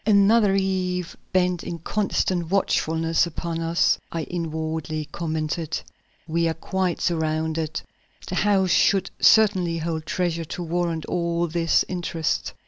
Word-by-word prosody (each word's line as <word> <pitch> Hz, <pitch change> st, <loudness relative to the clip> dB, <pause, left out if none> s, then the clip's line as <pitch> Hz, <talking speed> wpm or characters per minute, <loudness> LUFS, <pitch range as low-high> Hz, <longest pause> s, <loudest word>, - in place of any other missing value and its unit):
"Another 205 Hz, 0 st, +4 dB
eve 185 Hz, -2 st, -1 dB, 0.2 s
bent 180 Hz, -2 st, +1 dB
in 170 Hz, -, -5 dB
constant 180 Hz, -1 st, -1 dB
watchfulness 165 Hz, -3 st, +1 dB
upon 170 Hz, 0 st, -4 dB
us," 165 Hz, +1 st, +2 dB
I 165 Hz, -1 st, -2 dB
inwardly 160 Hz, -2 st, -3 dB
commented. 160 Hz, 0 st, -2 dB, 0.5 s
"We 170 Hz, +1 st, +1 dB
are 160 Hz, -, -1 dB
quite 185 Hz, +1 st, -1 dB
surrounded. 160 Hz, -1 st, -1 dB, 0.5 s
The -, -, -5 dB
house 190 Hz, -1 st, +2 dB
should 195 Hz, +2 st, +3 dB
certainly 190 Hz, -6 st, +4 dB
hold 160 Hz, -1 st, -3 dB
treasure 170 Hz, -2 st, -1 dB
to 175 Hz, -, -5 dB
warrant 170 Hz, -1 st, -1 dB
all 170 Hz, -1 st, 0 dB
this 165 Hz, 0 st, +2 dB
interest. 170 Hz, -3 st, -2 dB
170 Hz, 125 wpm, -24 LUFS, 160-185 Hz, 0.5 s, Another